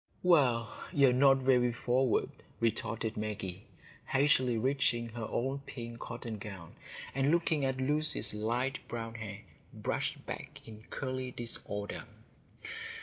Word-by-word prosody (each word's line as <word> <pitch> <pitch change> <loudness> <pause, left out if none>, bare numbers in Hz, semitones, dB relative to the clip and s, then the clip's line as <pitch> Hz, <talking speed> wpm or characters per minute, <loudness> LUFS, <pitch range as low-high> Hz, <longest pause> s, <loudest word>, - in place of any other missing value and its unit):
"Well, 130 -10 +4 0.2
you 140 -2 +6
are - - +3
not 135 +1 +6
very 125 -2 +4
forward," 125 +1 +2 0.3
retorted 115 -1 0
Maggie, 105 -3 -3 0.4
hastily 130 -3 +3
reaching 120 -1 +1
her 115 -1 -4
own 135 +3 0
pink 115 -2 -6
cotton 115 -2 -5
gown, 95 -5 -8 0.4
and 135 +1 +2
looking 165 -3 +2
at 130 -1 +1
Lucy's 150 +2 +1
light 120 +5 0
brown 115 -1 -4
hair 105 -3 -6 0.3
brushed - - -2
back - - -6
in 110 0 -10
curly 130 -1 -3
disorder. 110 -4 -4
120 Hz, 125 wpm, -33 LUFS, 110-135 Hz, 0.4 s, you